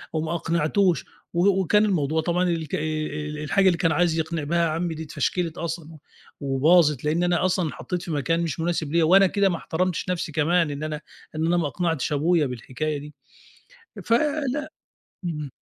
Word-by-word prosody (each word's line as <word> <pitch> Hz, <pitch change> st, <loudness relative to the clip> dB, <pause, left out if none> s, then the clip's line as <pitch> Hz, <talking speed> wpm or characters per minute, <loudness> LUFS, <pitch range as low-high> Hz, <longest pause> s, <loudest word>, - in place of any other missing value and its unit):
أو 155 Hz, -, +1 dB
ما 160 Hz, +2 st, -2 dB
أقنعتوش 170 Hz, +2 st, +1 dB, 0.3 s
و 175 Hz, +3 st, +3 dB
وكان 210 Hz, +4 st, +3 dB
الموضوع 160 Hz, -5 st, +1 dB
طبعًا 175 Hz, +2 st, 0 dB
الك 160 Hz, -3 st, -2 dB
ال 150 Hz, -1 st, -3 dB
الحاجة 190 Hz, +6 st, +2 dB
اللي 175 Hz, -, +3 dB
كان 165 Hz, -2 st, +2 dB
عايز 165 Hz, 0 st, +2 dB
يقنِع 160 Hz, -1 st, -2 dB
بها 170 Hz, +2 st, +1 dB
عمّي 165 Hz, +1 st, -2 dB
دي 160 Hz, -, -5 dB
اتفشكلِت 170 Hz, +2 st, -2 dB
أصلًا 165 Hz, -1 st, -5 dB
و 160 Hz, -, -12 dB, 0.6 s
وباظت 150 Hz, -1 st, +4 dB
لإن 160 Hz, +4 st, +1 dB
أنا 175 Hz, 0 st, +2 dB
أصلًا 185 Hz, -2 st, +1 dB
اتحطّيت 180 Hz, +4 st, -5 dB
في 170 Hz, -, -6 dB
مكان 165 Hz, +3 st, 0 dB
مش 165 Hz, -1 st, -3 dB
مناسب 165 Hz, -3 st, -1 dB
ليَّ 170 Hz, -, +4 dB
وأنا 190 Hz, +4 st, +6 dB
كده 200 Hz, +1 st, +2 dB
ما 170 Hz, -, -1 dB
احترمتش 180 Hz, +3 st, -2 dB
نَفْسي، 175 Hz, -3 st, -2 dB
كمان 160 Hz, +2 st, +2 dB
إن 145 Hz, +1 st, -5 dB
أنا 155 Hz, -1 st, -4 dB, 0.3 s
إن 160 Hz, -, 0 dB
أنا 175 Hz, +1 st, +2 dB
ما 165 Hz, -4 st, +1 dB
أقنعتش 165 Hz, -3 st, -1 dB
أبويا 160 Hz, +2 st, +2 dB
بالحكاية 130 Hz, +4 st, -3 dB
دي، 150 Hz, +1 st, -10 dB, 0.9 s
فلأ، 290 Hz, +3 st, 0 dB, 0.6 s
إمم. 150 Hz, -4 st, -4 dB
165 Hz, 180 wpm, -24 LUFS, 155-175 Hz, 0.9 s, وأنا